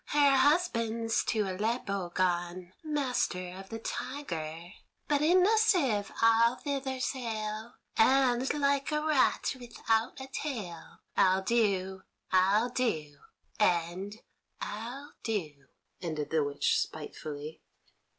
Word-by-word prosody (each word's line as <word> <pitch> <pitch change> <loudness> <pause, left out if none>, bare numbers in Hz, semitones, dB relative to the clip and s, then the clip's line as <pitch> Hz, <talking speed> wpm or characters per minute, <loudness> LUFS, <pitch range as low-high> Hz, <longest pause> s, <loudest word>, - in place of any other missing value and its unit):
Her 285 -2 +4
husband's 230 -7 +2
to 220 - +1
Aleppo 200 -1 -2
gone, 175 0 -1
master 250 - -1
of 190 0 -10
the 225 - -5
Tiger; 175 - -5 0.4
but 290 -1 +2
in 360 +4 +5
a 440 +2 +4
sieve 275 - +2
I'll 230 +1 +5
thither 270 -2 -3
sail, 225 -3 -3 0.2
and, 255 +1 +4
like 280 0 +1
a 300 - +1
rat 300 -3 +2
without 230 0 -1
a 265 - -6
tail, 235 - -6
I'll 190 0 +4
do, 190 -4 +1 0.3
I'll 195 +6 +4
do, 160 - -1 0.4
and 185 +2 0 0.4
I'll 245 +7 -6
do," 155 -11 -4 0.3
ended 155 -4 -3
the 160 -2 +3
witch 145 0 +1
spitefully. 150 0 -6
225 Hz, 110 wpm, -30 LUFS, 185-265 Hz, 0.4 s, in